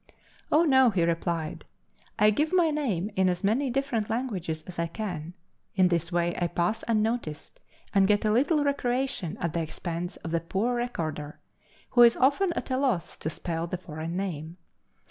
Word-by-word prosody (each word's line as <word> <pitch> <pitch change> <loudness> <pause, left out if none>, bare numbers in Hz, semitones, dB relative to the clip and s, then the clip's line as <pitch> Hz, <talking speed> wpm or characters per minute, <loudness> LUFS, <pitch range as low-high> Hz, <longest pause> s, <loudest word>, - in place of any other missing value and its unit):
"Oh, 310 +3 +5
no," 265 -5 +5
he 190 -6 +1
replied, 165 -1 -1 0.5
"I 210 0 +5
give 300 +9 0
my 350 -4 +4
name 220 - -1
in 190 -1 +3
as 180 +1 -2
many 245 +7 +2
different 245 -4 -1
languages 195 -10 -2
as 180 -2 -8
I 170 - +1
can. 175 -3 -5 0.4
In 185 -2 +4
this 170 0 0
way 175 0 +1
I 175 - +2
pass 175 +5 -1
unnoticed, 220 -8 -1 0.3
and 195 -1 +5
get 205 +1 +2
a 215 - +3
little 290 +7 +3
recreation 260 - -1
at 170 -2 -2
the 170 - 0
expense 170 +2 -4
of 165 - -4
the 170 - +2
poor 200 +8 -1
recorder, 155 -11 -4 0.5
who 240 - +5
is 235 -1 +8
often 290 +8 +3
at - - -4
a 255 - +2
loss 255 - 0
to 155 - -3
spell 165 +1 -3
the 180 - -3
foreign 165 0 -6
name. 170 -3 -4
190 Hz, 180 wpm, -27 LUFS, 170-245 Hz, 0.5 s, is